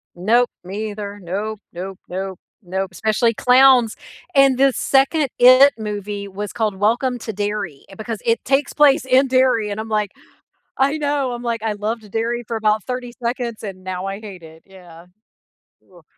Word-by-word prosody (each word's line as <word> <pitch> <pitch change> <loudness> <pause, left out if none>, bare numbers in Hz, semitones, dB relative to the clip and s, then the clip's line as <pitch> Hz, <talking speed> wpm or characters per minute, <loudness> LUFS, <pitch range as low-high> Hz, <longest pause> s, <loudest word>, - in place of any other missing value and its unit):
Nope, 230 +7 +2
me 210 +4 -5
either. 205 0 -7
Nope, 205 +5 -4
nope, 185 +2 -7
nope, 190 0 -5 0.2
nope, 190 +2 -3
especially 220 +5 +1
clowns! 250 -1 +5 0.4
And 275 -2 +5
the 275 0 +4
2nd 275 +3 +2
IT 255 +3 +8
movie 205 -1 -5
was 200 +1 -6
called 215 -4 -1
Welcome 240 +5 0
to 220 -1 -6
Derry 205 -7 -4
because 220 0 -5
it 230 0 +1
takes 275 +2 +1
place 290 -5 +4
in 260 +1 +4
Derry, 255 -4 +2
and 205 - -4
I'm 220 +1 -5
like 210 -2 0 0.7
I 280 +3 +3
know, 285 -3 -1
I'm 240 0 -6
like, 235 -2 -2
"I 220 - 0
loved 215 +1 -4
Derry 235 +2 -2
for 230 - -3
about 215 -1 +1
30 250 -1 -5
seconds, 235 -2 -3
and 190 -2 -7
now 185 0 -5
I 195 +1 -5
hate 195 -6 -10
it," 160 0 -15
yeah. 180 -3 -15 0.9
Oof. 175 -2 -18
220 Hz, 170 wpm, -20 LUFS, 195-250 Hz, 0.9 s, IT